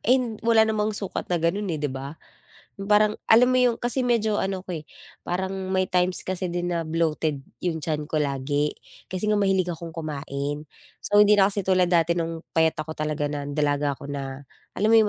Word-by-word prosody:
Eh, 255 +3 +4 0.2
wala 225 -1 +5
namang 215 -1 0
sukat 195 - -4
na 175 - +1
gano'n, 180 +5 0
eh, 165 - -1
di 150 -1 -1
ba? 135 +4 -6 0.6
'Yong 195 - -5
parang 210 0 +5 0.2
alam 240 +3 +7
mo 255 - +4
'yong 245 -2 +3
kasi 240 +3 -1
medyo 225 -4 +1
ano 190 -1 -2
ako, 170 -4 -4
eh, - - -16 0.4
parang 190 +2 -2 0.2
may 190 0 +2
times 180 0 +1
kasi 185 -1 -2
din 175 0 -2
na 165 -2 -2
bloated 155 -3 0 0.2
'yong 160 -4 -2
tiyan 150 -1 -2
ko 155 - -2
lagi, 145 0 0 0.4
kasi 185 +3 -2
nga 210 - +3
mahilig 190 -3 +2
akong 165 -1 -5
kumain. 145 -2 -4 0.4
So, 205 - +4
hindi 210 0 +6
na 195 0 +4
kasi 200 - -1
tulad 185 -1 +2
dati 170 0 +3
no'ng 165 0 -4
payat 160 -1 +3
ako 155 0 -6
talaga 150 -1 -1
na 145 -1 -4
dalaga 145 0 0
ko 140 - -10
na 135 -1 -5 0.3
alam 210 +3 0
mo 225 - +6
'yong 215 -1 +4
175 Hz, 205 wpm, -25 LUFS, 150-205 Hz, 0.6 s, alam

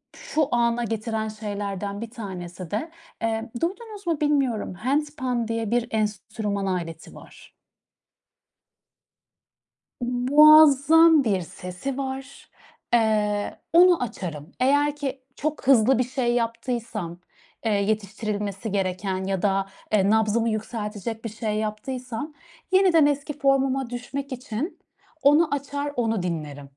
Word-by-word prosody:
şu 305 -2 -1
ana 235 0 +2
getiren 220 0 -2
şeylerden 205 -1 -4
bir 230 - -5
tanesi 185 -6 -7
de, 275 +11 -3 0.3
eee, 225 0 -2
duydunuz 405 +2 -4
mu 320 -3 0
bilmiyorum. 270 -10 +1
handpan 260 - -1
diye 230 -1 -2
bir 240 0 +1
enstrüman 210 -1 -2
aleti 170 -3 -4
var. - - -15 2.5
Muazzam 300 +4 +6
bir 195 -5 +1
sesi 180 +11 -6
var. 270 0 -6 0.4
Eee, 210 -3 +1
onu 350 -4 +6
açarım. 165 -7 -6
Eğer 285 +3 +3
ki 275 -2 -4
çok 305 -2 -3
hızlı 255 -1 +5
bir - - +4
şey 245 -1 -1
yaptıysam, 230 -6 -3 0.5
eee, 220 - +2
yetiştirilmesi 205 0 -2
gereken 190 -1 -1
ya 190 -1 -2
da 195 -1 +1 0.3
eee, 200 -1 +4
nabzımı 220 +1 +2
yükseltecek 215 0 -4
bir 230 - -2
şey 215 0 -3
yaptıysam 245 +6 -4 0.4
yeniden 370 -5 +5
eski 290 0 -1
formuma 270 -2 +2
düşmek 270 +3 -5
için 255 - -5 0.4
onu 295 +2 +4
açar, 285 +1 -4
onu 225 -5 0
dinlerim. 150 -5 -5
230 Hz, 115 wpm, -25 LUFS, 205-275 Hz, 2.5 s, Muazzam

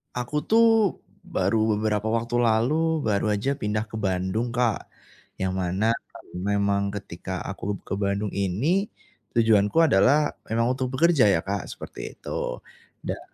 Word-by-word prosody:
Aku, 125 +4 -4
tuh, 225 -2 +4 0.3
baru 110 -10 +1
beberapa 105 0 -1
waktu 115 +2 0
lalu, 145 +8 +2
baru 105 0 +1
aja 120 +7 -1
pindah 105 -1 -1
ke 110 - -5
Bandung, 95 +4 -1
Kak. 120 -3 0 0.5
Yang 95 0 -2
mana, 95 +4 0 0.5
memang 100 +1 0
ketika 95 -2 -6
aku 100 +1 -4
ke - - -5
Bandung 100 0 -1
ini 125 - 0 0.5
tujuanku 110 0 +3
adalah 145 +3 +4 0.2
memang 115 +2 +1
untuk 130 0 -3
bekerja, 160 -5 +4
ya, 95 -5 +3
Kak, 100 -1 -3
seperti - - -8
itu. - - -4 0.4
Dan, - - -3
110 Hz, 135 wpm, -25 LUFS, 100-125 Hz, 0.5 s, tuh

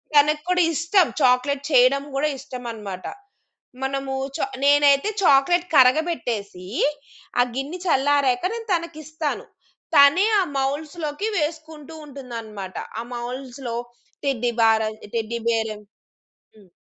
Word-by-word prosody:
తనకి 300 +1 +4
కూడా 360 0 +3
ఇష్టం 340 +3 +3
చాక్లేట్ 260 +2 +3
చేయడం 265 +1 +5
కూడా 285 +3 +1
ఇష్టమన్నమాట 230 -8 -7 0.8
మనము 270 0 -2 0.2
చా - - 0 0.2
నేనైతే 285 +3 +5
చాక్లేట్ 345 +4 +4
కరగబెట్టేసి 250 - +2 0.8
ఆ - - +6
గిన్నె 285 +7 -4
చల్లారాక 280 -4 +2
నేను 460 0 -6
తనకిస్తాను. 315 - -3 0.5
తనే 285 +7 +7 0.2
ఆ - - +2
మౌల్డ్స్‌లోకి 300 +6 -2
వేసుకుంటూ 315 0 -4
ఉంటుందన్నమాట. 230 -8 -8 0.2
ఆ - - -4
మౌల్డ్స్‌లో 245 0 -6 0.5
టెడ్డీ 245 -3 0
బార్ 220 -1 +4 0.3
టెడ్డీ 230 +1 -2
బేర్ 225 -1 0 0.9
హ్మ్. 205 -3 -19
275 Hz, 105 wpm, -23 LUFS, 245-310 Hz, 0.9 s, తనే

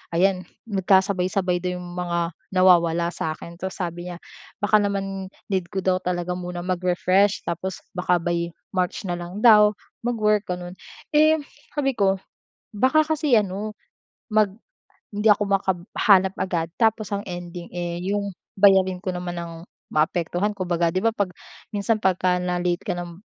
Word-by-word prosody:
ayan 185 +1 +3 0.2
nagkasabay-sabay 190 -2 +2
daw 180 0 -2
'yong 180 0 -8
mga 170 -1 -1 0.2
nawawala 170 -2 +4
sa'kin. 170 +2 -5
Tas 190 0 -4
sabi 175 0 -4
niya, 175 - -6 0.5
baka 210 +1 +5
naman 195 -1 -2 0.2
need 185 -2 0
ko 190 -1 -3
daw 185 0 +3
talaga 180 0 -2
muna 180 -1 -5
mag-refresh. 185 +2 +2
Tapos 180 +2 -3
baka 180 -1 +2
by 170 -1 -1 0.2
March 185 +2 -1
na 175 - -1
lang 180 +6 -6
daw 210 -2 +7 0.3
mag-work, 215 -3 +1
ganon. 180 0 -4 0.4
Eh, 310 +1 +5 0.4
sabi 275 -2 +1
ko 195 -3 +2 0.6
baka 260 +9 +3
kasi 300 -5 +2
ano 210 +1 -1 0.6
mag 215 -2 +4 0.7
hindi 210 +1 +3
ako 205 0 +3
makab 195 -2 +1 0.2
hanap 190 -2 +4
agad 170 -3 -1
tapos 220 -3 +2
ang 200 - -2
ending, 175 -1 -7
eh, 175 0 -3
yung 200 0 -2 0.2
bayarin 190 -2 +5
ko 185 -1 -3
naman 175 -1 -4
ang 165 -1 -7 0.3
maapektuhan. 175 +5 +1
Kumbaga, 175 -2 +1
'di 185 - -1
ba, 225 - +3
'pag 200 -4 0 0.4
minsan 210 +2 +1
pagka 180 -1 +2
na-late 180 -1 -1
ka - - -2
nam 175 +2 -8
185 Hz, 150 wpm, -24 LUFS, 175-205 Hz, 0.7 s, daw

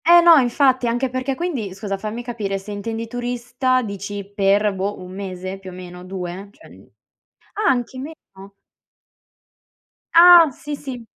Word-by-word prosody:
Eh 345 +1 +8
no, 340 -1 +8
infatti, 255 -1 +2
anche 245 +2 -1
perché 255 +1 -2
quindi, 260 - -4
scusa, 195 0 -4
fammi 215 +4 -6
capire 215 -5 -3
se 195 +2 -9
intendi 225 +3 -4
turista, 245 +2 -1
dici 200 -1 -6
per, 200 +1 +2
boh, 195 +2 -3
1 180 0 -10
mese 190 -1 -6
più 190 -1 -10
o - - -10
meno, 180 0 -10
2 185 +1 -6
cioè 320 - -18
mhmm - - -17 0.7
ah 425 +1 0
anche 255 0 -2
meno? 285 +5 -6 2.0
Ah 340 -1 +9
sì, 295 +3 -7
sì, 265 -4 -7
230 Hz, 155 wpm, -21 LUFS, 195-260 Hz, 2.0 s, Ah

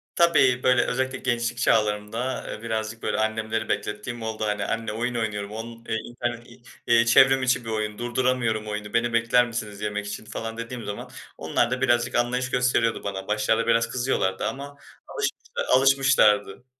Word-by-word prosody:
Tabii. 135 -7 +4
Böyle, 125 -1 +4
özellikle 130 +1 -1
gençlik 120 -1 -1
çağlarımda, 110 +3 0
eee, 105 - -7
birazcık 110 0 -4
böyle - - -1
annemleri 110 0 -1
beklettiğim 105 +3 -3
oldu. 110 -1 -4
Hani, 105 -1 -1
"Anne 115 -1 -2
oyun 120 +2 -2
oynuyorum, 105 -3 -2
onun, 115 +1 -8
eee, - - 0
internet 120 0 -5
i - - -17 0.3
eee, 120 0 +5
çevrim 130 +3 +5
içi 125 -1 +1
bir - - -5
oyun. 105 -1 -2
Durduramıyorum 120 -3 0
oyunu, 105 0 -5
beni 120 0 +1
bekler 115 +1 +3
misiniz 105 -3 -5
yemek 105 0 -3
için?" 105 +1 -6
falan 115 +1 -6
dediğim 115 0 -6
zaman 105 0 -6 0.3
onlar 95 +9 0
da 130 0 -2
birazcık 120 -1 +2
anlayış 125 +1 0
gösteriyordu 125 -2 +1
bana. 95 -1 -5
Başlarda 105 +2 +1
biraz 115 0 +3
kızıyorlardı 120 -7 -1
ama 140 +1 -6 0.3
alışmış - - -3 0.3
alışmışlardı. 130 -5 +3
115 Hz, 165 wpm, -25 LUFS, 110-125 Hz, 0.3 s, eee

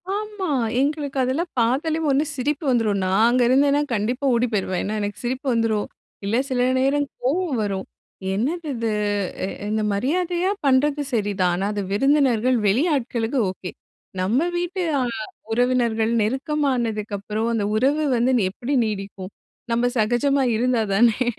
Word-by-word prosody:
ஆமா. 420 -2 -4 0.3
எங்களுக்கு 285 -1 -1
அதெல்லாம் 305 +7 -1
பாத்தாலே 280 +8 +1
ஒண்ணு 275 +2 +3
சிரிப்பு 285 +4 -2
வந்துரும். 225 -5 +2
நான் 195 +4 +3
அங்கே 250 0 +3
இருந்தேன்னா, 280 +3 +4
கண்டிப்பா 240 +6 -1
ஓடி 240 +1 +2
போயிருவேன். 190 -3 -1
ஏன்னா, 210 +2 -2
எனக்கு 205 0 -4
சிரிப்பு 255 +3 -3
வந்துரும். 225 -2 0 0.4
இல்ல 205 +3 0
சில 250 -1 +1
நேரம், 285 +2 +2 0.2
கோவம் 300 +1 0
வரும். 195 -2 -3 0.5
என்னது 305 - -2
இது? 230 -1 -1 0.5
இ - - -3 0.2
இந்த 215 0 0
மரியாதையா 350 - 0
பண்ணுறது 280 +2 +3
சரிதான். 200 -5 +1
ஆனா, 190 - -2
அது 205 - -2
விருந்தினர்கள், 255 0 +3
வெளி 225 +9 +3
ஆட்களுக்கு 240 0 -1
ஓகே. 185 -1 -8 0.5
நம்ப 215 +9 +2 0.2
வீட்டு 355 +2 -2 0.2
அ - - +1 0.5
உறவினர்கள், 235 -2 +1
நெருக்கமானதுக்கப்புறம் 225 -5 -1
அந்த 220 -3 0
உறவு 275 +7 +2
வந்து 245 +3 +2 0.2
எப்படி 245 +8 -4
நீடிக்கும்? 195 -2 -5 0.4
நம்ப 235 +1 +2
சகஜமா 255 +5 +2
இருந்தா 245 0 +1
தானே. 230 +3 +3
245 Hz, 135 wpm, -22 LUFS, 215-280 Hz, 0.5 s, இருந்தேன்னா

